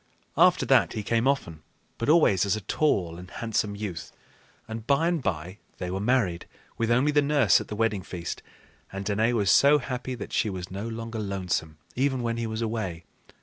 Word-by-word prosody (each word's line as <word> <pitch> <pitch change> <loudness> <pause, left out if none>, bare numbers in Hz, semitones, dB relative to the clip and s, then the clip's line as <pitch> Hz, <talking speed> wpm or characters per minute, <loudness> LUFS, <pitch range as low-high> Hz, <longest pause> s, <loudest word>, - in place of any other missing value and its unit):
After - - +4
that - - +4
he 105 - -4
came 115 +4 +1
often, 85 - -1 0.4
but 115 - -1
always 150 - +5
as 100 0 +1
a 110 - -5
tall 90 - 0
and 90 0 -11
handsome 105 -2 -2
youth; 100 -5 -6 0.6
and 110 0 -7
by 140 +4 +3
and 170 -3 0
by 90 -1 -3 0.2
they 90 - -4
were 95 - -2
married, 105 -6 0 0.3
with 115 0 -1
only 125 +5 +3
the 145 0 +4
nurse 140 -8 +4
at - - -8
the 105 - -5
wedding 110 -2 0
feast, 85 -2 -6 0.5
and 100 +1 -5
Danaë 110 +4 +1
was 100 -5 +2
so 145 +2 +6
happy 130 -1 -4
that - - -8
she 110 - +1
was 90 -2 -6
no 100 +4 -4
longer 115 0 -5
lonesome 90 -6 -3 0.2
even 130 -1 0
when 115 0 -1
he 115 -1 -2
was 110 +1 -3
away. 100 -7 -3
110 Hz, 195 wpm, -26 LUFS, 95-125 Hz, 0.6 s, so